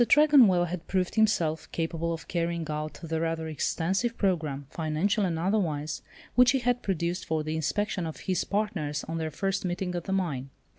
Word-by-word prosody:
Tregonwell 250 -11 +6
had 175 0 -5
proved 185 -2 0
himself 175 -8 +1
capable 165 0 -2
of 165 -1 -5
carrying 170 -1 -1
out 150 -1 -3
the 160 0 -2
rather 165 -1 -1
extensive 190 - -1
programme, 155 -8 0
financial 175 +7 0
and 170 -3 -1
otherwise, 160 -5 0 0.3
which 250 +1 +6
he - - +3
had 245 -1 +1
produced 175 -1 -1
for 160 -1 -1
the 155 +1 -3
inspection 180 +3 -1
of 160 - -7
his 185 -2 0
partners 195 -8 -1
on 165 +1 -4
their 160 -1 -2
first 190 +5 -1
meeting 180 0 -2
at 175 -1 -3
the 195 - -3
mine. 155 -9 -1
170 Hz, 180 wpm, -28 LUFS, 160-195 Hz, 0.3 s, Tregonwell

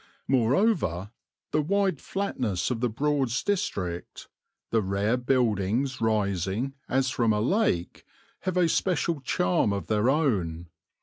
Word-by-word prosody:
Moreover, 125 - +1 0.4
the 155 - +2
wide 190 0 +1
flatness 125 - -2
of 120 - -1
the 125 0 +1
Broads 135 0 0
District, 100 - -3 0.4
the 115 - +3
rare 100 +4 0
buildings 125 0 0
rising 105 +2 0 0.2
as 130 0 +1
from 120 -6 +2
a 105 - +1
lake, 120 - 0 0.4
have 185 0 -2
a 180 -2 +4
special 165 -2 0
charm 90 -4 +1
of 100 -4 -2
their 110 +3 +2
own. 95 - 0
120 Hz, 125 wpm, -27 LUFS, 100-150 Hz, 0.4 s, a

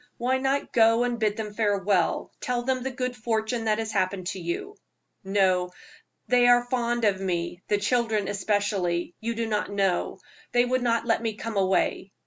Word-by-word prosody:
Why 255 +2 +1
not 270 +1 -1
go 230 0 +5
and 245 -1 -1
bid 210 -2 0
them 210 -2 -5
farewell? 200 -4 +1
Tell 245 -1 -1
them 260 0 0
the 265 - -2
good 255 -1 -3
fortune 225 +1 -2
that 215 -1 +2
has 220 -1 -3
happened 185 0 -1
to 195 - -5
you." 175 - -4 0.5
"No; 190 -2 +2 0.6
they 245 -1 +4
are 245 0 +6
very 245 - -15
fond 240 -2 0
of 195 -2 +1
me 175 -1 -2
the 205 - +2
children 215 -1 0
especially. 195 -4 -1
You 230 +1 -3
do 230 0 -1
not 210 -1 -1
know; 195 -3 0 0.4
they 245 0 +4
would 255 +1 0
not 230 -1 +1
let 225 -1 +1
me 225 -2 -2
come 225 +1 -5
away." 190 0 0
220 Hz, 185 wpm, -26 LUFS, 195-240 Hz, 0.6 s, are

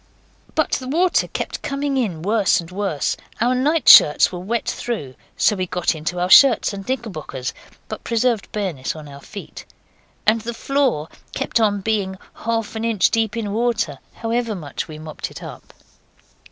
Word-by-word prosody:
But - - +1
the 255 - -2
water 345 +6 +2
kept - - -4
coming 280 0 -2
in 195 -12 -1
worse 210 0 +3
and 170 0 -8
worse. 190 -6 -1 0.2
Our 240 +3 +2
nightshirts 260 - +6
were 180 - -5
wet 225 +6 -2
through, 205 - -3 0.2
so 210 - +3
we 185 -1 -2
got 180 -1 0
into 160 +3 -4
our 175 - -1
other 180 - -1
shirts 265 -6 +7
and 195 +3 -8
knickerbockers, 180 - -4 0.3
but - - -7
preserved 230 -2 0
bareness 180 -12 -3
in 155 -1 -9
our 140 0 -11
feet. 200 +6 -9 0.6
And 220 +1 +3
the 235 +1 -5
floor 265 - 0 0.3
kept - - 0
on 205 -3 +2
being 195 -2 -1 0.2
half 225 -1 -3
an 220 - -3
inch 225 -5 +2
deep 225 -1 0
in 210 -3 -3
water, 235 0 0
however 230 -1 -2
much 150 -7 -5
we 155 - -9
mopped 155 0 -6
it - - -10
up. - - -10
215 Hz, 170 wpm, -21 LUFS, 180-235 Hz, 0.6 s, shirts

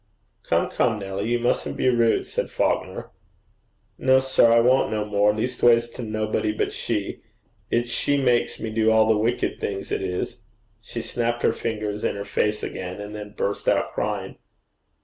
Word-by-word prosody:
'Come, - - +2
come, 115 -3 +1
Nelly, 95 0 -4
you 120 - +2
mustn't 120 +1 -1
be - - +1
rude,' 120 -2 +3
said - - -3
Falconer. - - -1 0.9
'No, 130 0 +5
sir, 130 -3 +4
I 115 - +6
won't 125 +3 +4
no 105 -1 -1
more, 105 0 +3
leastways 115 +1 +2
to 120 - -8
nobody 110 -1 -1
but 105 - -2
she. - - -3 0.5
It's 120 0 0
she 145 +4 +1
makes 125 -3 +1
me 110 - -4
do 110 0 +2
all 110 0 +5
the 110 - +4
wicked 115 +3 0
things, 100 -1 -4
it - - -1
is.' 90 -1 -3 0.4
She - - -6
snapped 120 0 -2
her - - +3
fingers 105 -2 -3
in - - 0
her 100 0 -5
face 105 +1 0
again, 90 +1 -5
and 105 +1 -7
then 105 -1 -8
burst 100 - -2
out - - +2
crying. - - -3
110 Hz, 175 wpm, -24 LUFS, 105-120 Hz, 0.9 s, I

